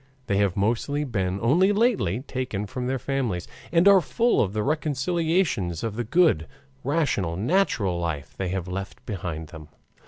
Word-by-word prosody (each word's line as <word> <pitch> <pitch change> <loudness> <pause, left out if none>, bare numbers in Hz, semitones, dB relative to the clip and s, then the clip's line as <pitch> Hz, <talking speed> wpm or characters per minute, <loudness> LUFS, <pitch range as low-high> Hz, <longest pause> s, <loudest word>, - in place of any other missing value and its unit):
They 100 -6 0
have 100 -2 +1
mostly 120 +8 0
been 95 -8 -1
only 175 - +4
lately 205 - +1
taken 130 -7 -4
from 125 +4 -4
their 130 +1 0
families, 125 -9 -2 0.2
and 170 +3 +4
are 200 -2 +8
full 235 +8 +2
of 95 - 0
the 105 +1 -1
recollections 150 - 0
of 115 -2 -3
the 120 - -2
good, 125 - +3 0.4
rational, 130 - 0
natural 105 - +1
life 75 -4 -3
they 95 -2 -3
have 95 -1 -3
left 95 +2 -6
behind 85 -6 -5
them. 80 -4 -10
115 Hz, 160 wpm, -25 LUFS, 95-155 Hz, 0.4 s, are